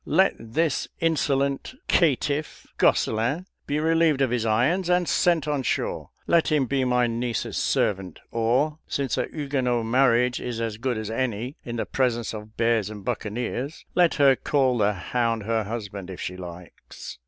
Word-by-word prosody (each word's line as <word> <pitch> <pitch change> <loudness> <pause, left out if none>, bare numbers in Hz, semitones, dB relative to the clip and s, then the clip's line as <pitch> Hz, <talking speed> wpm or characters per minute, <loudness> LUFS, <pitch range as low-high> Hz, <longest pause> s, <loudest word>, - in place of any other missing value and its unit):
Let 190 +5 +3
this 135 +7 -1
insolent 140 - 0
caitiff, 150 -2 +1
Gosselin, 120 +11 +2 0.2
be 145 +1 0
relieved 160 -2 +3
of 130 -3 +2
his 120 -2 0
irons 150 - +2
and 180 -1 +2
sent 170 -4 +2
on 145 -2 0
shore. 125 - -2 0.2
Let 165 -1 +3
him 150 -3 +3
be 135 +1 0
my 125 -1 +3
niece's 120 0 -2
servant 95 -4 0
or, 130 +7 +1
since 135 -3 -1
a - - 0
Huguenot 130 -6 -1
marriage 125 0 +3
is 120 -2 -4
as 115 -2 -2
good 125 0 -1
as 110 0 -4
any 120 +2 -2
in 120 - -5
the 115 - -2
presence 120 -4 0
of 110 0 -9
bears 115 -3 +2
and 105 -2 -9
buccaneers, 120 +7 -3
let 175 -2 +3
her 140 -2 +5
call 130 -1 +1
the 105 0 +3
hound 115 +4 -1
her 110 0 0
husband, 100 -4 -6
if 95 - -7
she 90 - -4
likes. 90 -6 -10
125 Hz, 165 wpm, -25 LUFS, 110-145 Hz, 0.2 s, her